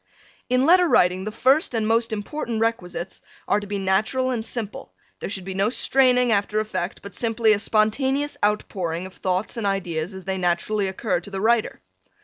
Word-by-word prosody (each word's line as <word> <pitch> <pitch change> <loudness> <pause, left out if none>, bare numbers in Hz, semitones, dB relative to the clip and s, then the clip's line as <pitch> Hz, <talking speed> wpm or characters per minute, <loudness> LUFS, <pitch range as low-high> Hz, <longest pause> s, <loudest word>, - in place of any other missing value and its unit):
In 255 +1 +3
letter 355 +2 +6
writing 180 +2 +3
the 215 - -3
first 260 +4 +2
and 220 -1 0
most 230 +1 +2
important 225 +2 -3
requisites 190 -5 -3 0.3
are 205 - +2
to 205 - -8
be 205 0 -3
natural 210 +7 +1
and 235 -3 -2
simple; 220 -3 -6 0.3
there - - -5
should 190 -3 -5
be 190 - -4
no 195 +3 +1
straining 250 -1 +3
after 210 0 +1
effect, 210 -4 -4
but 200 - -9
simply 225 -1 +2
a 205 - 0
spontaneous 265 +7 +1
out 210 +1 +1
pouring 170 -2 -3
of 190 - -10
thoughts 185 +5 -2
and 215 -3 -1
ideas 180 -2 -2
as 190 - -9
they 190 -1 -2
naturally 185 +4 0
occur 190 -1 -1
to 180 - -9
the 195 -1 -4
writer. 225 +2 +1
210 Hz, 190 wpm, -23 LUFS, 190-235 Hz, 0.3 s, letter